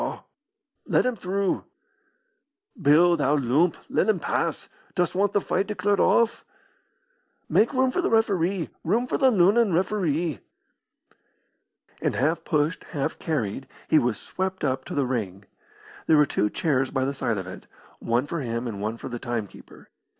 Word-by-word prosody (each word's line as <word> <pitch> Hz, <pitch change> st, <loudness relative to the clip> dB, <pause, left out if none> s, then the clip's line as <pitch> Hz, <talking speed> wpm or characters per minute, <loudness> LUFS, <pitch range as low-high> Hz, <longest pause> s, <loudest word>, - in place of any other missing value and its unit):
"Let -, -, +2 dB
him 255 Hz, -1 st, 0 dB
through." 195 Hz, 0 st, -1 dB, 1.2 s
"Bill, 170 Hz, +3 st, +5 dB
thou 150 Hz, -2 st, +2 dB
loomp, 145 Hz, +6 st, +2 dB
let -, -, +1 dB
him 210 Hz, -5 st, +2 dB
pass. -, -, -2 dB, 0.3 s
Dost 175 Hz, -2 st, +1 dB
want 200 Hz, +2 st, +1 dB
the 205 Hz, -, +2 dB
fight 195 Hz, 0 st, -1 dB
declared 205 Hz, -1 st, 0 dB
off?" 235 Hz, -1 st, +3 dB, 1.0 s
"Make 225 Hz, -, +3 dB
room 260 Hz, -1 st, +2 dB
for 360 Hz, -, 0 dB
the -, -, 0 dB
referee! 195 Hz, -5 st, +1 dB
room 225 Hz, +9 st, +1 dB
for -, -, -2 dB
the 265 Hz, -2 st, +5 dB
Lunnon 205 Hz, 0 st, +4 dB
referee!" 170 Hz, -, 0 dB, 1.6 s
And -, -, 0 dB
half 155 Hz, +6 st, 0 dB
pushed, 150 Hz, 0 st, 0 dB
half 145 Hz, +1 st, -2 dB
carried, 135 Hz, -, -2 dB, 0.2 s
he 155 Hz, -, +5 dB
was 120 Hz, -5 st, -1 dB
swept 190 Hz, 0 st, -4 dB
up 135 Hz, -2 st, -1 dB
to -, -, -6 dB
the 140 Hz, -2 st, +1 dB
ring. 105 Hz, -6 st, -3 dB, 0.6 s
There 160 Hz, -, +5 dB
were 150 Hz, -, +6 dB
two 105 Hz, -5 st, 0 dB
chairs 135 Hz, +1 st, 0 dB
by 130 Hz, -1 st, -1 dB
the 140 Hz, -, -1 dB
side 115 Hz, -5 st, -1 dB
of 95 Hz, -, -4 dB
it, 95 Hz, -, -10 dB, 0.3 s
one 120 Hz, +3 st, 0 dB
for 170 Hz, +3 st, -4 dB
him 115 Hz, -1 st, -3 dB
and 100 Hz, -4 st, -5 dB
one 110 Hz, +2 st, -3 dB
for -, -, -7 dB
the 120 Hz, -1 st, -5 dB
timekeeper. 115 Hz, -4 st, -7 dB
160 Hz, 160 wpm, -25 LUFS, 130-195 Hz, 1.6 s, were